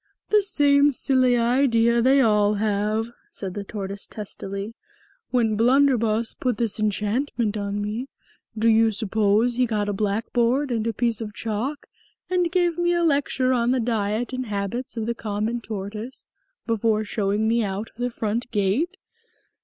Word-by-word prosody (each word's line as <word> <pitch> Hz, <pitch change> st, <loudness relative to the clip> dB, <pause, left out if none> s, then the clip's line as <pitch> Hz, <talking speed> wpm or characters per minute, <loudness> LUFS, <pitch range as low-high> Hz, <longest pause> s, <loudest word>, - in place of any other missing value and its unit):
"The 425 Hz, -1 st, +5 dB
same 290 Hz, -6 st, +4 dB
silly 255 Hz, -2 st, +2 dB
idea 235 Hz, -1 st, +3 dB
they 270 Hz, +3 st, +5 dB
all 210 Hz, -3 st, +3 dB
have," 215 Hz, +2 st, -1 dB, 0.2 s
said 190 Hz, -2 st, -6 dB
the 205 Hz, -, -5 dB
Tortoise 200 Hz, -1 st, -5 dB
testily. 200 Hz, 0 st, -6 dB, 0.6 s
"When 230 Hz, -4 st, +1 dB
Blunderbus 235 Hz, -2 st, +3 dB
put 250 Hz, -4 st, 0 dB
this 230 Hz, -1 st, -1 dB
enchantment 215 Hz, +2 st, -1 dB
on 200 Hz, 0 st, -3 dB
me, 215 Hz, +5 st, -3 dB, 0.5 s
do 225 Hz, +1 st, +2 dB
you 225 Hz, 0 st, +5 dB
suppose 215 Hz, +3 st, +1 dB
he 250 Hz, -1 st, +3 dB
got 210 Hz, -2 st, -1 dB
a -, -, -1 dB
blackboard 235 Hz, +6 st, 0 dB
and 225 Hz, -1 st, -1 dB
a -, -, +1 dB
piece 230 Hz, 0 st, 0 dB
of 210 Hz, -2 st, -6 dB
chalk 230 Hz, +7 st, -3 dB, 0.5 s
and 355 Hz, -2 st, +1 dB
gave 350 Hz, -2 st, +1 dB
me 345 Hz, 0 st, +2 dB
a 345 Hz, 0 st, +1 dB
lecture 280 Hz, -4 st, +1 dB
on 240 Hz, -1 st, +1 dB
the 255 Hz, 0 st, +2 dB
diet 225 Hz, +1 st, -1 dB
and 255 Hz, -1 st, -3 dB
habits 210 Hz, +5 st, -4 dB
of 220 Hz, -, -2 dB
the 235 Hz, -, -1 dB
common 220 Hz, +1 st, -3 dB
tortoise, 215 Hz, +3 st, -6 dB, 0.4 s
before 225 Hz, -1 st, +1 dB
showing 210 Hz, 0 st, -1 dB
me 230 Hz, +1 st, +2 dB
out 200 Hz, +2 st, -4 dB
of -, -, -39 dB
the 245 Hz, 0 st, -1 dB
front 230 Hz, +1 st, -3 dB
gate? 235 Hz, -, 0 dB
225 Hz, 160 wpm, -24 LUFS, 210-255 Hz, 0.6 s, The